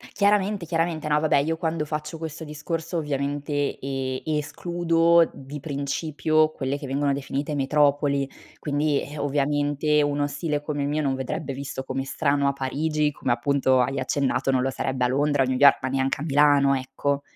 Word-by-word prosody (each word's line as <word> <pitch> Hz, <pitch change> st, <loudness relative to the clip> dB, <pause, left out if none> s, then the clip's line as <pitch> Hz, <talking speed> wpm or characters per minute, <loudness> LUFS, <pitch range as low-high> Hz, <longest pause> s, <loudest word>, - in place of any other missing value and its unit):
Chiaramente, 200 Hz, -2 st, +2 dB
chiaramente. 165 Hz, -1 st, -1 dB
No, 150 Hz, 0 st, +3 dB
vabbè, 155 Hz, -2 st, +3 dB
io 155 Hz, +4 st, +1 dB
quando 160 Hz, -1 st, -2 dB
faccio 150 Hz, +1 st, -4 dB
questo 160 Hz, 0 st, -6 dB
discorso 160 Hz, +3 st, -4 dB
ovviamente 145 Hz, -1 st, -2 dB
e 130 Hz, -1 st, -3 dB, 0.2 s
escludo 170 Hz, +1 st, +2 dB
di 140 Hz, +2 st, -8 dB
principio 155 Hz, +2 st, 0 dB
quelle 135 Hz, 0 st, -3 dB
che 145 Hz, -, -8 dB
vengono 140 Hz, +1 st, 0 dB
definite 140 Hz, +2 st, -3 dB
metropoli. 140 Hz, 0 st, +2 dB, 0.3 s
Quindi, 145 Hz, 0 st, 0 dB
eh, 145 Hz, +1 st, -8 dB
ovviamente 145 Hz, +1 st, +1 dB
uno 145 Hz, 0 st, 0 dB
stile 145 Hz, +1 st, -2 dB
come 145 Hz, -1 st, -3 dB
il 140 Hz, -, -1 dB
mio, 155 Hz, +1 st, 0 dB
non 135 Hz, -2 st, 0 dB
vedrebbe 135 Hz, +2 st, -4 dB
visto 135 Hz, 0 st, -5 dB
come 135 Hz, 0 st, -3 dB
strano 140 Hz, 0 st, 0 dB
a -, -, -1 dB
Parigi, 150 Hz, +3 st, -1 dB
come 130 Hz, -3 st, -2 dB
appunto 130 Hz, +1 st, +2 dB
hai 135 Hz, +2 st, 0 dB
accennato, 135 Hz, 0 st, 0 dB
non 130 Hz, -, +2 dB
lo 130 Hz, -, 0 dB
sarebbe 130 Hz, -1 st, -1 dB
a -, -, +3 dB
Londra 140 Hz, +1 st, +2 dB
o -, -, +1 dB
a -, -, -4 dB
New 130 Hz, -, 0 dB
York, 140 Hz, +1 st, +7 dB
ma 130 Hz, -, -2 dB
neanche 135 Hz, +1 st, 0 dB
a 145 Hz, -, -4 dB
Milano, 145 Hz, -2 st, +4 dB
ecco. 135 Hz, +2 st, -2 dB
145 Hz, 180 wpm, -24 LUFS, 135-155 Hz, 0.3 s, York